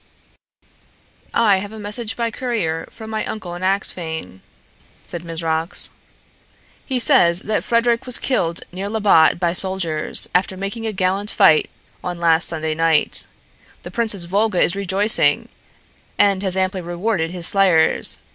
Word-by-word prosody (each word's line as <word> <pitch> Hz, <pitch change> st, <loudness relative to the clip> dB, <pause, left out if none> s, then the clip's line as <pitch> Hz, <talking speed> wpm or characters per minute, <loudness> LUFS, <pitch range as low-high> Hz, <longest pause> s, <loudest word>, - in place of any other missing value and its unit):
"I 210 Hz, -4 st, +3 dB
have 200 Hz, +2 st, -6 dB
a 220 Hz, -, -10 dB
message 210 Hz, +2 st, -4 dB
by 235 Hz, -1 st, -1 dB
courier 215 Hz, -11 st, -3 dB
from 220 Hz, -1 st, -11 dB
my 220 Hz, -1 st, -2 dB
uncle 190 Hz, -5 st, -6 dB
in 175 Hz, -, -8 dB
Axphain," 165 Hz, -, -1 dB, 0.6 s
said 170 Hz, -1 st, -7 dB
Mizrox. 165 Hz, 0 st, -2 dB, 0.9 s
"He 260 Hz, -, -2 dB
says 210 Hz, -, +4 dB
that 215 Hz, 0 st, -1 dB
Frederic 235 Hz, +1 st, +1 dB
was 250 Hz, -, +2 dB
killed 170 Hz, -10 st, -1 dB
near 190 Hz, +3 st, -5 dB
Labbot 205 Hz, -7 st, +3 dB
by 170 Hz, -1 st, 0 dB
soldiers, 180 Hz, -5 st, +2 dB
after 185 Hz, +1 st, 0 dB
making 205 Hz, +4 st, -4 dB
a -, -, -1 dB
gallant 190 Hz, +1 st, -1 dB
fight, 155 Hz, -7 st, +4 dB, 0.3 s
on 175 Hz, -1 st, -5 dB
last 165 Hz, -1 st, +2 dB
Sunday 160 Hz, -1 st, -2 dB
night. 165 Hz, 0 st, +2 dB, 0.6 s
The -, -, -9 dB
Princess 220 Hz, -6 st, 0 dB
Volga 200 Hz, +1 st, 0 dB
is 175 Hz, -, +2 dB
rejoicing, 200 Hz, +2 st, +2 dB, 0.7 s
and 200 Hz, -2 st, +3 dB
has 190 Hz, -2 st, 0 dB
amply 185 Hz, 0 st, -1 dB
rewarded 175 Hz, 0 st, -2 dB
his 175 Hz, -1 st, -5 dB
slayers. 180 Hz, -5 st, +3 dB
190 Hz, 140 wpm, -19 LUFS, 170-215 Hz, 0.9 s, says